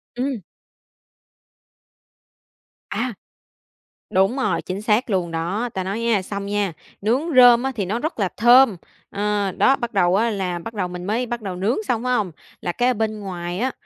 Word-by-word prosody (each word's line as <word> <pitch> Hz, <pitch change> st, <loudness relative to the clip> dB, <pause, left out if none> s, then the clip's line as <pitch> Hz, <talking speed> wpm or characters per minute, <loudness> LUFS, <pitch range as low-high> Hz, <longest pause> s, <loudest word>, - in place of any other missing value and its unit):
Ừm. 255 Hz, -2 st, -2 dB, 2.5 s
À! 235 Hz, +4 st, -2 dB, 1.0 s
Đúng 195 Hz, +6 st, +2 dB
rồi, 210 Hz, -11 st, 0 dB
chính 185 Hz, +2 st, -5 dB
xác 215 Hz, +3 st, +1 dB
luôn 180 Hz, -4 st, 0 dB
đó. 180 Hz, +9 st, -2 dB
Ta 190 Hz, -, -2 dB
nói 195 Hz, +4 st, -3 dB
nha, 230 Hz, -4 st, +1 dB
xong 200 Hz, +1 st, -5 dB
nha, 200 Hz, -3 st, -1 dB, 0.3 s
nướng 230 Hz, +7 st, +2 dB
rơm 245 Hz, -1 st, +8 dB
á 270 Hz, -, 0 dB
thì 205 Hz, -4 st, -1 dB
nó 210 Hz, +6 st, -2 dB
rất 310 Hz, -2 st, -4 dB
là 195 Hz, -3 st, +1 dB
thơm, 240 Hz, -2 st, +6 dB, 0.3 s
ờ, 205 Hz, -1 st, -1 dB
đó, 270 Hz, -, +3 dB
bắt 240 Hz, -4 st, -5 dB
đầu 180 Hz, -2 st, +3 dB
á 225 Hz, +4 st, +2 dB
là 185 Hz, -5 st, -2 dB
bắt 225 Hz, +7 st, -8 dB
đầu 195 Hz, -4 st, -2 dB
mình 180 Hz, 0 st, -7 dB
mới 225 Hz, +5 st, 0 dB
bắt 240 Hz, -1 st, -4 dB
đầu 195 Hz, -3 st, -5 dB
nướng 195 Hz, +7 st, 0 dB
xong, 235 Hz, -1 st, 0 dB
phải 250 Hz, 0 st, +1 dB
hông? 210 Hz, -7 st, 0 dB, 0.3 s
Là 175 Hz, -, -1 dB
cái 245 Hz, +7 st, 0 dB
ở 255 Hz, -, +3 dB
bên 215 Hz, -1 st, -2 dB
ngoài 180 Hz, -2 st, -5 dB
á, 260 Hz, +3 st, 0 dB
210 Hz, 185 wpm, -22 LUFS, 190-240 Hz, 2.5 s, rơm